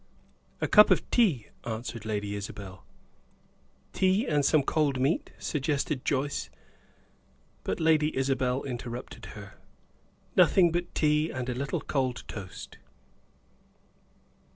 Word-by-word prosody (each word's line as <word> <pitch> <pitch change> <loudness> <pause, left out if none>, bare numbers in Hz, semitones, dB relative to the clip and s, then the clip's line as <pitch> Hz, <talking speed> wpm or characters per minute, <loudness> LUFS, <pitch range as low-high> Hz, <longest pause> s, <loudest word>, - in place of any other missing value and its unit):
"A - - +1
cup 210 -1 +7
of - - +2
tea," 180 - +2
answered 115 -1 -5
Lady 105 -2 -2
Isabel. 100 -2 -7 1.1
"Tea 190 +3 +2
and 145 -2 +1
some 145 +1 +4
cold 140 -2 +1
meat?" 140 +7 0
suggested 145 -1 -1
Joyce. 140 +1 -1 1.1
But - - -2
Lady 155 -2 +2
Isabel 130 -1 0
interrupted 120 -1 -6
her. - - -11 0.8
"Nothing 175 -3 +5
but 175 +1 -3
tea 150 +1 +2
and 130 -1 -4
a - - -1
little 135 +3 -2
cold 130 -4 -1
toast." 95 -4 -8
135 Hz, 110 wpm, -28 LUFS, 120-155 Hz, 1.1 s, cup